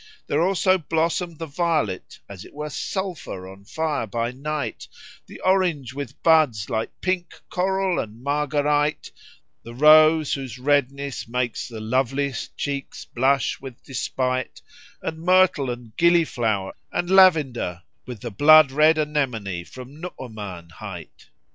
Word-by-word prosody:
There 150 - 0
also 185 +1 +3
blossomed 165 +1 -1
the 165 - -5
violet 155 - -1
as 100 -1 -10
it - - -15
were 150 0 -5
sulphur 175 - -4
on 95 +1 -13
fire 155 -1 -2
by 115 +3 -2
night; 150 +3 -4 0.4
the - - -11
orange 175 -9 +1
with 140 +1 -7
buds 145 -10 +3
like 110 -1 -1
pink 185 -2 -2
coral 190 0 0
and 110 +2 -6
marguerite; 145 +1 0 0.5
the 115 0 -11
rose 155 +2 +6
whose 130 -4 -5
redness 140 0 0
gars 120 0 -2
the 115 -3 -8
loveliest 130 +4 -1
cheeks 140 -2 -4
blush 135 +1 0
with 130 -3 -10
despight; 130 -1 -3 0.4
and 160 0 -4
myrtle 180 -6 +3
and 120 -2 -7
gilliflower 125 - +2 0.2
and 175 +1 -2
lavender 145 - +4 0.2
with 120 -5 -8
the 120 - -5
blood 150 +5 +7
red 155 +3 +4
anemone 125 - -1
from 130 - -12
Nu'uman 105 - -8
hight. - - -10
140 Hz, 130 wpm, -23 LUFS, 120-160 Hz, 0.5 s, blood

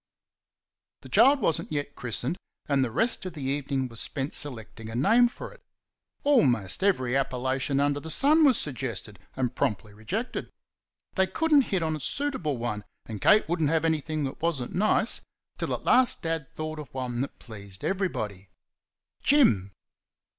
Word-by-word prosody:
The - - -12
child 280 +1 +5
was 160 - +2
n't - - -12
yet 145 -1 -3
christened, 125 +4 -2 0.3
and 140 -2 +2
the 125 - -1
rest 225 - 0
of 180 - -7
the 150 -4 -7
evening 135 -1 -1
was 115 -2 -5
spent 135 +1 -3
selecting 115 -5 -3
a 115 - -6
name 225 - +5
for 240 - -9
it. - - -20 0.6
Almost 130 - +2
every 130 -11 +2
appellation 130 +1 0
under 145 0 +1
the 160 - -8
sun 300 - +4
was 270 -6 +5
suggested 125 -7 -4 0.2
and 125 -2 -1
promptly 105 -3 -2
rejected. 190 - -4 0.6
They 190 -1 +2
could 325 +7 0
n't 280 -3 +6
hit 185 -4 -1
on 160 -1 0
a - - -6
suitable 180 - 0
one, 110 -3 -3 0.2
and 110 -3 -7
Kate 215 0 +5
would 170 +1 -1
n't 150 - +3
have 165 0 +1
anything 155 -1 0
that 135 - -5
was 165 -3 +1
n't 125 - -6
nice, 215 +4 +2 0.4
till - - -2
at - - -2
last 255 -1 +4
Dad 165 -3 -2
thought 155 0 -4
of 145 -4 -9
one 125 -2 -2
that 140 - -4
pleased 100 -4 -11
everybody 110 - -2 0.7
"Jim!" 110 - +4
145 Hz, 175 wpm, -27 LUFS, 120-185 Hz, 0.7 s, n't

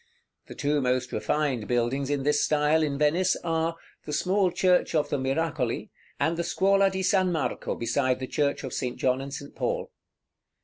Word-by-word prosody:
The - - -9
two 145 0 0
most 125 0 0
refined 125 +1 -1
buildings 125 +3 0
in 145 -2 0
this 145 +1 +2
style 150 +1 +2
in 145 -3 0
Venice 170 +6 +2
are, 165 0 0 0.3
the 150 - -5
small 185 +4 +2
Church 180 -1 +2
of 150 -2 +1
the 145 - -1
Miracoli, 135 -1 -1 0.3
and 165 +1 +1
the 170 - 0
Scuola 195 +3 +3
di 190 0 -2
San 185 -1 +2
Marco 160 -4 -2
beside 130 +2 0
the 130 - -3
Church 145 +2 -1
of 130 - -5
St. 125 -2 -3
John 130 0 +1
and 140 0 -7
St. 140 +1 -7
Paul. - - -2
150 Hz, 180 wpm, -27 LUFS, 135-170 Hz, 0.3 s, Scuola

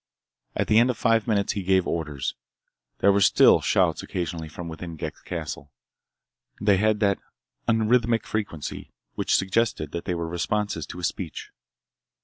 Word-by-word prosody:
At - - +1
the 110 - +5
end 120 +2 +4
of 125 - -1
five 115 -1 +2
minutes 100 -3 +1
he 100 - -3
gave 95 0 +2
orders. 75 -5 -2 0.7
There 100 - +6
were 100 +1 +2
still 95 - +6
shouts - - +2
occasionally 85 -2 -4
from 85 +3 -7
within 85 +1 -7
Ghek's 75 - -6
castle. 80 -4 -6 0.9
They 100 -2 +4
had 110 +2 +2
that 100 -2 +2 0.5
unrhythmic 115 0 +2
frequency 100 -9 -4 0.2
which - - +1
suggested 95 -6 0
that 85 - -5
they 90 - -1
were 85 -1 -3
responses 85 0 -2
to 90 - -8
a - - -8
speech. 85 -1 -4
95 Hz, 155 wpm, -25 LUFS, 85-110 Hz, 0.9 s, There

